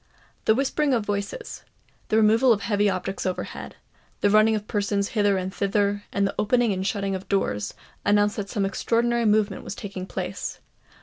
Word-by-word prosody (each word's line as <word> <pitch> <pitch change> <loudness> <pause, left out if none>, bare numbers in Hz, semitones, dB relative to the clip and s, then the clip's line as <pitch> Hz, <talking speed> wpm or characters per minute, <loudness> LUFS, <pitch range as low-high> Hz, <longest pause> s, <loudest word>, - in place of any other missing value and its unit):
The 220 - +5
whispering 275 +1 +1
of 225 -3 -1
voices—the 205 - -5
removal 225 +4 +5
of 210 -3 +2
heavy 205 -1 +2
objects 195 +1 -3
overhead—the 185 +2 -5
running 215 +1 +5
of 210 0 -4
persons 200 -1 0
hither 205 -3 +2
and 185 0 -3
thither—and 200 0 0
the 195 - -1
opening 235 0 +2
and 190 0 -2
shutting 200 -2 -1
of 190 0 -6
doors, 105 - -1 0.3
announced 205 0 +3
that 200 -2 -4
some 200 -2 0
extraordinary 235 +4 +1
movement 215 -1 +2
was - - -6
taking 195 -2 -6
place. - - -4
205 Hz, 160 wpm, -25 LUFS, 195-220 Hz, 0.3 s, The